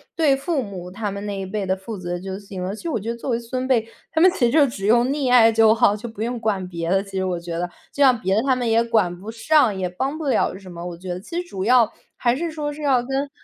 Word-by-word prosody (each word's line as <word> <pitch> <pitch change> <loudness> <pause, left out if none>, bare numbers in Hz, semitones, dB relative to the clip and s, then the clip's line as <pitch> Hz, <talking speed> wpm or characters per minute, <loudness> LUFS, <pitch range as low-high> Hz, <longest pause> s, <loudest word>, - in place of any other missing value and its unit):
对 300 -5 +3
父 280 +2 -1
母 185 -5 -7
他 205 +2 -3
们 200 +1 -6
那 200 -1 -4
一 - - -3
辈 200 +1 -3
的 190 0 +1
负 195 +3 -7
责 175 -1 -4
就 190 +1 -5
行 195 -2 -8
了。 190 +3 -3
其 - - -12
实 340 - -2
我 235 - -1
觉 215 +3 -5
得 235 - -2
作 250 - -4
为 230 - +1
孙 255 +2 -4
辈， 235 -4 +2 0.2
他 320 - 0
们 370 - +8
其 385 - -7
实 235 - +2
就 290 0 +5
只 200 -6 -5
用 235 +3 +4
溺 275 -2 0
爱 230 -2 +7
就 220 -1 +5
好， 215 -2 +3
就 220 +3 -7
不 220 -2 -9
用 240 +2 -2
管 205 -5 -1
别 170 -2 -4
的， 195 0 +3
其 195 - -14
实 190 - 0
我 180 -2 -2
觉 170 -1 -5
得。 175 +1 -1 0.2
这 285 - +1
样 255 -3 +5
别 190 -1 +1
的 220 - +3
他 265 -1 +2
们 245 -2 -1
也 225 +1 +4
管 215 -7 +1
不 210 +4 -7
上， 230 0 +3
也 185 -1 -2
帮 265 - -3
不 315 - -4
了 265 - +1
什 190 -2 -12
么， 170 0 -7
我 175 -1 -5
觉 185 +2 -9
得。 175 0 -3
其 220 - -9
实 355 - -12
主 190 - -5
要， 235 0 +4 0.3
还 240 0 +2
是 330 +4 -3
说 300 -2 -3
是 300 - -10
要 270 -4 +3
跟 270 +3 -2
225 Hz, 330 characters per minute, -22 LUFS, 190-255 Hz, 0.3 s, 们